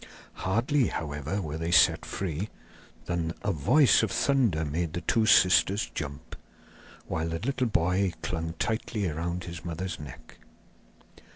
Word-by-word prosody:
Hardly, 115 +7 +1
however, 80 +4 -3
were 80 0 -5
they 80 +1 -2
set 85 -2 +4
free, 95 +1 -3 0.6
than 85 -1 -2
a 100 - +1
voice 120 - +4
of 110 - 0
thunder 115 - +1
made 80 +2 -2
the 85 - -3
two 110 +6 +1
sisters 90 -2 +4
jump, 70 -4 -6 0.7
while 80 +1 -2
the 80 - -2
little 130 +5 -1
boy 90 -1 +1
clung 80 -1 -3
tightly 110 -1 -1
round 85 +3 -3
his 85 -2 -8
mother's 85 0 -4
neck. - - -11
85 Hz, 135 wpm, -28 LUFS, 80-100 Hz, 0.7 s, set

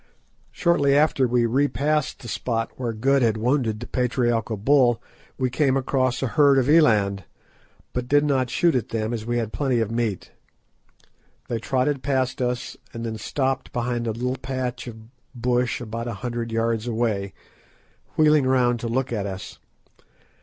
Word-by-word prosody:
Shortly 145 -6 +2
after 145 -3 +3
we 120 0 +2
re 135 +5 +2
passed 150 0 -1
the - - -8
spot 115 0 -2
where 120 -3 -2
Good 135 +5 +2
had 110 -2 +2
wounded 115 -2 0
the 120 - -6
patriarchal 120 -3 0
bull 120 +1 +3 0.4
we 130 -1 0
came 135 0 +2
across 130 -1 0
a - - +1
herd 145 -1 +4
of 130 -1 +2
eland, 105 -11 +4 0.7
but 125 -1 -3
did 145 +2 +4
not 130 -4 +1
shoot 170 +4 +2
at 125 -5 -1
them, 110 0 -2
as 110 -1 -5
we 120 0 0
had 110 -2 -2
plenty 135 -5 +1
of 110 -1 -1
meat. 115 -5 -2 1.2
They 115 - -1
trotted 130 +4 0
past 130 -1 -1
us, 125 0 -2 0.2
and 115 0 -4
then 110 -1 -4
stopped 130 +3 -2
behind 120 -1 -2
a - - +1
little 125 +4 -2
patch 130 -2 -4
of 115 -2 -7 0.4
bush 125 0 0
about 115 0 -5
a 120 - -3
hundred 120 -1 -3
yards 115 0 0
away, 110 -4 -1 0.8
wheeling 150 -3 +4
round 125 -2 +2
to 115 - -4
look 125 +1 -1
at 100 -3 -2
us. 95 -1 -7
125 Hz, 165 wpm, -24 LUFS, 115-135 Hz, 1.2 s, herd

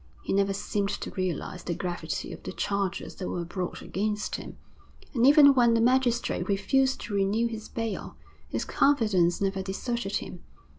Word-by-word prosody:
He - - -2
never 200 0 +2
seemed 200 +1 -1
to - - -5
realise 185 -1 -3
the 170 0 -3
gravity 180 -1 -4
of - - -10
the - - -6
charges 200 -2 -2
that 185 - -4
were 175 -1 -3
brought 180 +1 -4
against 210 +2 -2
him, - - -9 0.6
and 245 -1 +4
even 285 -1 +8
when 240 -3 +4
the - - +3
magistrate 245 0 +2
refused 260 +7 +2
to 210 - -6
renew 200 +3 +2
his 225 -2 -5
bail, 225 -2 -4 0.3
his - - -2
confidence 205 -12 +2
never 195 -1 0
deserted 200 +2 -3
him. 180 -2 -4
205 Hz, 165 wpm, -28 LUFS, 190-235 Hz, 0.6 s, even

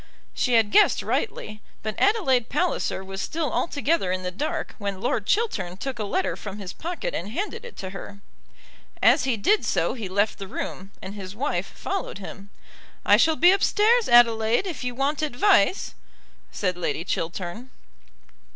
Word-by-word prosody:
She 250 - 0
had 225 -3 +4
guessed 420 - +5
rightly, 215 - -3 0.2
but 215 0 -2
Adelaide 305 - +2
Palliser 315 - -1
was 195 +1 -6
still 320 -2 -2
altogether 290 - 0
in 185 0 -2
the 180 - -3
dark 290 +12 -3
when 200 -2 -3
Lord 215 -2 -1
Chiltern 195 - 0
took 260 +2 -5
a - - -1
letter 375 - -1
from 195 - -7
his 195 -3 -7
pocket 360 +9 -4
and - - -4
handed 415 - -4
it 485 - -11
to 190 -1 -6
her. 200 +1 -9 0.8
As - - +5
he 255 -4 +1
did 415 - +3
so - - +1
he 220 -7 -6
left 205 +3 0
the 195 - -6
room, 190 0 -6
and 190 - -6
his 195 -1 -8
wife 280 +6 -1
followed 390 - -4
him. 200 0 -9 0.6
"I - - +7
shall 320 -1 +4
be 350 +3 +6
upstairs, 430 +4 +3
Adelaide, 230 - +5
if 340 -9 -5
you 250 -1 -3
want 275 +3 0
advice," 310 - +2 0.6
said 185 -3 -1
Lady 170 -1 -2
Chiltern. 175 +7 -4
235 Hz, 170 wpm, -25 LUFS, -, 0.8 s, I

